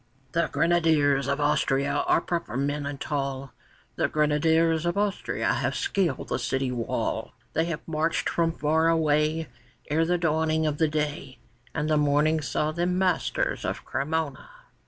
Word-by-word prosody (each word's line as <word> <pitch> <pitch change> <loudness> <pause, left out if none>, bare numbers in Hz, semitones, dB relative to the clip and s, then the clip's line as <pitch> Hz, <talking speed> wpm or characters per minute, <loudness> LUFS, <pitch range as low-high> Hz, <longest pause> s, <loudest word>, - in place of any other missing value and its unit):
] 135 -1 -36
The 170 0 +1
Grenadiers 155 -5 +3
of 140 +1 0
Austria 140 -2 +1
are - - +4
proper 170 -10 -3
men 145 +1 -1
and 140 -1 -5
tall; 135 -2 -3 0.4
The - - +2
Grenadiers 160 +2 +2
of 175 - -1
Austria 205 -1 0
have - - -1
scaled 190 -4 -1
the - - -1
city 130 -1 -1
wall; 120 -2 -2 0.2
They 160 - +1
have 165 -2 -5
marched 160 0 0
from 165 -1 +1
far 160 +1 +1
away 155 0 +2 0.4
Ere 160 +2 +3
the 175 +1 +1
dawning 160 -1 +1
of 150 -1 -1
the 160 - +4
day, 150 -3 -3 0.4
And 150 0 -1
the 155 -1 +2
morning 150 +2 +2
saw 150 +1 -1
them 175 +3 0
masters 185 -3 0
of - - -4
Cremona. 160 - -2
155 Hz, 155 wpm, -26 LUFS, 145-165 Hz, 0.4 s, are